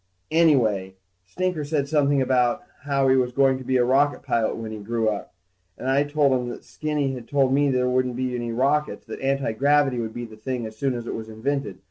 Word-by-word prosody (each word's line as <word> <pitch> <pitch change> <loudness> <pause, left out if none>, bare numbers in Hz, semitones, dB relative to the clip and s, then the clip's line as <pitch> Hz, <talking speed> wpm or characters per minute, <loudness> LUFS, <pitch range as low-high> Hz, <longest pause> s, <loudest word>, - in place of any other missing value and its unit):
Anyway, 115 - +3 0.3
Stinker 180 - -2
said 145 -1 -1
something 145 -2 +2
about 125 -2 +1 0.2
how 140 -1 +2
he 130 - +5
was 125 -1 +1
going 135 0 +3
to - - -8
be 130 +1 +1
a 120 - +3
rocket 140 +3 +2
pilot 115 -2 0
when 110 -1 -6
he 110 - -6
grew 115 +2 -1
up, 105 -2 -3 0.4
and 130 - -6
I 135 +2 +3
told 145 -1 +2
him 125 -2 0
that - - -8
Skinny 150 -3 -2
had 120 -3 -8
told 135 -2 +2
me 145 +1 +3
that 130 - +1
there 125 0 +1
wouldn't 125 -1 0
be 130 0 -2
any 120 -1 -3
rockets, 140 +5 0
and - - -5
that - - -10
antigravity 135 0 +2
would 110 -1 -4
be 120 0 -4
the 110 -1 -13
thing 125 +1 -4
as 110 0 -8
soon 130 +2 -1
as 120 -1 -5
it - - -4
was 110 0 -6
invented. 125 -1 -3
130 Hz, 230 wpm, -24 LUFS, 120-140 Hz, 0.4 s, he